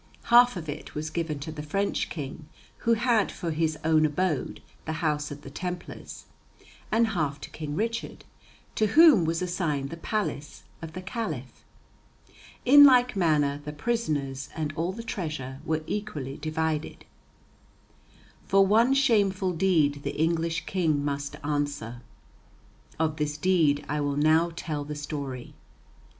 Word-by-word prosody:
Half 245 -2 +7
of 160 -2 -6
it 145 0 -7
was 155 +1 -4
given 165 -3 -2
to 160 +2 -5
the 155 -1 -6
French 195 +7 -1
king, 150 0 -7 0.3
who 230 - +2
had 230 -2 +2
for 170 -3 -4
his 160 0 0
own 155 -1 +4
abode 155 0 -1 0.3
the 160 - -2
House 150 -2 -1
of 145 0 -9
the 135 - -9
Templars, 180 +2 -6 0.7
and 225 +1 +3
half 150 -8 -1
to - - -9
King 150 -2 -5
Richard, 230 +4 -3 0.5
to 215 - +2
whom 310 - +8
was 165 +2 -1
assigned 165 -6 -2
the 165 - -6
palace 165 -7 -3 0.2
of 160 -1 -8
the 185 +2 -7
Caliph. 180 - -5 1.0
In 285 +3 +9
like 250 -3 +6
manner 150 -6 +2
the 150 - -5
prisoners 150 - -2
and 155 -2 -3
all 170 +3 -1
the 230 +4 -7
treasure 150 - -5
were 160 -1 -1
equally 155 -11 -4
divided. 155 0 -3 1.4
For 195 0 +5
one 230 +7 +4
shameful 200 -8 +2
deed 160 -5 +2
the - - -4
English 165 0 0
King 155 -6 0
must 145 0 -3
answer. 145 -5 -2 1.0
Of 155 -1 0
this 150 -1 -2
deed 155 -4 +2
I 150 0 -1
will 145 -1 -1
now 160 +3 +3
tell 150 -3 -4
the 150 +1 -6
story. 140 -4 -6
160 Hz, 145 wpm, -27 LUFS, 145-190 Hz, 1.4 s, In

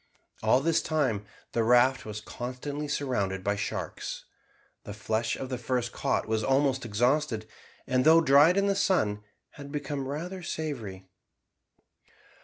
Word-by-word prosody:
All 130 - +4
this 165 +2 +2
time 130 -10 -1 0.2
the 115 - +1
raft 125 +3 +4
was 105 0 -5
constantly 130 +6 -5
surrounded 100 -10 -1
by 100 +1 +1
sharks. 100 - -4 0.6
The 100 - -8
flesh 110 +2 -1
of 130 - -6
the 130 -2 -3
first 120 -1 -1
caught - - -1
was 110 0 0
almost 135 0 +2
exhausted, 120 +1 +1 0.4
and 130 0 +1
though 160 +3 +7
dried 150 +3 +6
in 200 - +3
the 200 - +2
sun 110 - +1 0.3
had 140 -1 -10
become 145 -2 -3
rather 175 +7 -5
savoury. 120 - -5
130 Hz, 140 wpm, -28 LUFS, 110-150 Hz, 0.6 s, though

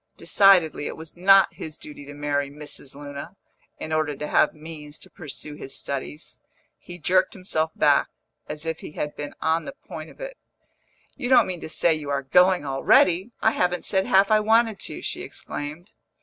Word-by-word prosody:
Decidedly, 180 -7 +4
it - - -6
was 160 -1 -9
not 195 +2 +5
his 155 -1 -7
duty 145 -1 -11
to 145 - -9
marry 145 -1 -1
Mrs. 145 -2 -4
Luna, 145 +5 -8 0.4
in 155 - -4
order 155 -2 0
to 150 - -5
have - - +3
means 150 -1 -9
to - - -15
pursue 150 -1 -7
his 135 -2 -4
studies; 140 +3 -5 0.4
he 175 - -10
jerked 185 +2 +2
himself 160 -4 -1
back, - - +4 0.4
as 150 +1 -4
if 160 0 -3
he - - -9
had 150 -1 -4
been 145 0 -7
on 160 +1 +1
the - - -6
point - - -8
of - - -17
it. - - -7 0.8
"You 245 - -4
don't 245 -3 +6
mean 180 -2 -5
to - - -6
say 165 +1 +3
you 150 -2 -5
are 140 -1 -1
going 180 +4 +4
already? 170 - +3
I 220 - +5
haven't 180 -4 0
said 190 -1 +1
half 195 +2 +4
I 215 - +6
wanted 220 0 +3
to!" - - -5
she - - -4
exclaimed. 150 +6 -7
160 Hz, 190 wpm, -24 LUFS, 145-190 Hz, 0.8 s, don't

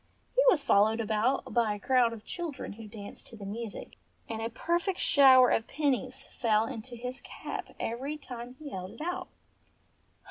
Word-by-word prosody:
He - - +5
was 320 - +3
followed 215 +3 +4
about 225 +4 0
by 225 -3 +2
a - - -9
crowd 250 +1 +3
of 220 -2 -9
children 335 - -4
who 220 +1 -10
danced 205 -1 -9
to - - -11
the 205 -3 -9
music, 220 +2 -6 0.3
and 225 -1 -4
a 225 - -2
perfect 345 - -1
shower 260 -3 +7
of 225 - +1
pennies 270 -2 0
fell 220 -2 +2
into 230 +2 -7
his 250 +2 -6
cap - - -7
every 270 +6 -3
time 250 -3 -8
he 295 -1 -8
held 185 0 -6
it - - -11
out. 360 +2 -3
240 Hz, 175 wpm, -30 LUFS, 220-275 Hz, 0.3 s, shower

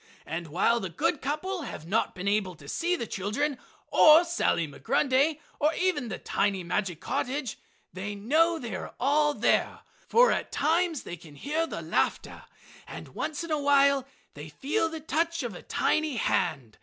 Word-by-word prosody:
And 165 +1 -4
while 190 +9 +2
the 190 - -4
good 225 - -1
couple 335 +7 -2
have 235 - -7
not 210 +7 0
been 185 +1 -5
able 200 -3 +1
to 145 -2 -15
see 350 - 0
the 235 - -4
children 235 +9 -2 0.3
or 310 +2 +8
Sally 335 - 0
Migrundy, 275 - +1 0.2
or 305 +2 +2
even 360 -9 0
the - - -4
tiny 195 -2 -1
magic 175 -1 -2
cottage, 260 -2 -3 0.3
they 200 +3 -5
know 315 +11 +2
they 240 -8 -6
are 190 - -6
all 295 +3 +2
there, - - +1 0.3
for - - +5
at - - -2
times 330 0 +1
they 175 - -7
can 155 -3 -14
hear 310 - -1
the - - -6
laughter - - -1 0.4
and - - -9
once 310 +2 -4
in 335 - -6
a 300 -1 +1
while 280 -1 +4 0.3
they 150 +2 -9
feel 295 - -1
the 320 -1 -7
touch 330 +2 -1
of 240 -4 -4
a 175 - -9
tiny 310 -3 0
hand. 135 - -1
275 Hz, 175 wpm, -28 LUFS, 195-315 Hz, 0.4 s, or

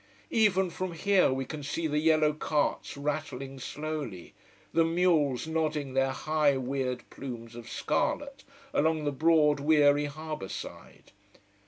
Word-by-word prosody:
Even 190 -5 +3
from 185 +1 -4
here 195 -1 +3
we 130 0 -2
can 155 +3 -6
see 155 +4 -3
the 150 -1 +1
yellow 155 -1 +3
carts 150 -1 -1
rattling 140 -2 -4
slowly, 145 - -5 0.4
the 165 - +4
mules 165 -6 +2
nodding 155 -4 -1
their 135 0 +2
high 150 0 +1
weird 130 -1 -3
plumes 120 -3 -7
of 120 -1 -9
scarlet 280 - -1 0.3
along 155 0 +2
the 145 - 0
broad 150 0 +3
weary 145 -1 +4
harbour 155 -7 -6
side. - - -9
150 Hz, 135 wpm, -29 LUFS, 135-160 Hz, 0.4 s, the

